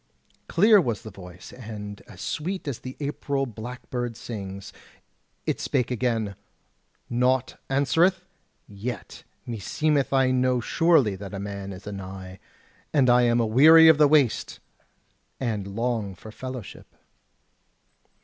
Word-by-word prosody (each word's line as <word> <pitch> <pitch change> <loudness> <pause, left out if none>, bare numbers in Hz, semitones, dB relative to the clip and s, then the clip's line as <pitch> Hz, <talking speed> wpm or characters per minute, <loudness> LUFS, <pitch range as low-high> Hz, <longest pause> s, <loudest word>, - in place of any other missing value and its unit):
Clear 210 +3 +5
was 115 -7 -3
the 110 - -8
voice, 90 -2 -12
and 105 -4 -8
as - - -12
sweet 180 +2 -3
as 135 -5 -3
the 130 0 -8
April 140 -1 -2
blackbird 120 0 -6
sings. 100 -5 -7 0.7
It - - -1
spake 125 -2 -1
again: 115 -4 -1 0.7
"Naught 125 +1 0
answereth, 160 +7 +2 0.4
yet 105 +3 -7 0.2
meseemeth 140 +5 0
I 135 -1 +3
know 130 -1 +2
surely 140 - +3
that 100 +1 -8
a - - -5
man 100 0 -6
is 95 0 -10
anigh; 95 -2 -8 0.5
and 135 -5 +4
I 125 0 +5
am 120 0 +3
aweary 155 +9 +7
of 160 -2 +5
the 150 - +7
waste, 140 -6 +2 0.8
and 110 -6 -2
long 110 -1 -2
for 110 +5 -11
fellowship." 130 -2 -9
120 Hz, 125 wpm, -25 LUFS, 105-135 Hz, 0.8 s, aweary